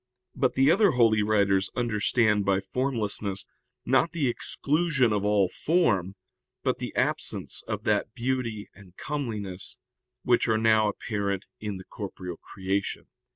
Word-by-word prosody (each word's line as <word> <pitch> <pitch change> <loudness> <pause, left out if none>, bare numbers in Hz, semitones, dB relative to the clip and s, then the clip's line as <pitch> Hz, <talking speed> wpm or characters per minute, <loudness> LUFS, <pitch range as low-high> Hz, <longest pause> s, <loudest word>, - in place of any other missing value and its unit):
But 130 -1 +1
the 135 +3 +5
other 200 0 +4
holy 115 -3 +4
writers 100 -2 +2
understand 110 -2 +2
by 95 -1 +2
formlessness, 105 -3 -2 0.4
not 135 +7 +3
the 155 -5 +1
exclusion 140 -1 +1
of 105 -1 0
all 105 -2 +3
form, 100 - +1 0.5
but - - 0
the - - -4
absence - - -1
of - - -3
that - - 0
beauty 120 -4 -2
and 95 -2 -17
comeliness 110 -10 -4 0.5
which 120 0 +3
are 110 -1 +3
now 110 -1 +4
apparent 100 -2 -3
in 105 -2 -4
the 95 - -9
corporeal 95 -5 -7
creation. 95 +1 -3
110 Hz, 135 wpm, -27 LUFS, 100-130 Hz, 0.5 s, the